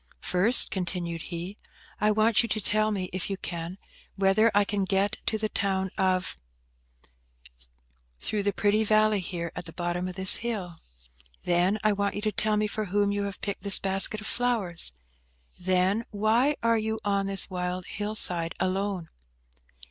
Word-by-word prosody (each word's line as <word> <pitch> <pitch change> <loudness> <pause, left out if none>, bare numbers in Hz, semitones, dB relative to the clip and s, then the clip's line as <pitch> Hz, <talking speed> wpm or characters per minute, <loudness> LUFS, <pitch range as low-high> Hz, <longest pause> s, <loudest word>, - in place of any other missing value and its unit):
"First," 200 +7 +4
continued 175 -3 -3
he, 175 +4 -6 0.4
"I 210 - +2
want 215 +1 +4
you 230 - -3
to 215 - 0
tell 215 +1 +1
me, 195 -3 -2
if 185 +1 -3
you 195 - -3
can, 170 0 -6 0.4
whether 195 +3 +3
I 205 0 +4
can 200 0 -1
get 195 +1 +1
to 220 - +1
the 215 0 -1
town 190 -3 -1
of 185 - 0 0.8
—, - - -26
through 210 - -1
the 200 0 +1
pretty 205 +2 +1
valley 215 -1 +3
here 170 -2 -5
at - - -6
the 165 - -10
bottom 175 +1 -2
of 180 - -7
this 190 0 +6
hill? 195 -8 -4 0.6
Then, 180 +4 +2
I 215 -1 +3
want 200 0 -1
you 205 - -3
to 215 0 0
tell 215 +1 +1
me 210 - +1
for 215 +1 -3
whom 205 +1 +1
you 205 0 -1
have 200 -1 -7
picked 200 -1 -4
this 200 0 +3
basket 195 +2 +4
of - - -7
flowers? 220 - +1 0.7
Then, 185 +4 +1
why 225 +7 +2
you 220 -1 +1
are 200 -1 +1
on 195 - -2
this 195 0 -1
wild 180 0 -3
hill 210 +1 -5
side 170 -5 -2
alone? 185 -2 -2
195 Hz, 175 wpm, -27 LUFS, 180-215 Hz, 0.8 s, this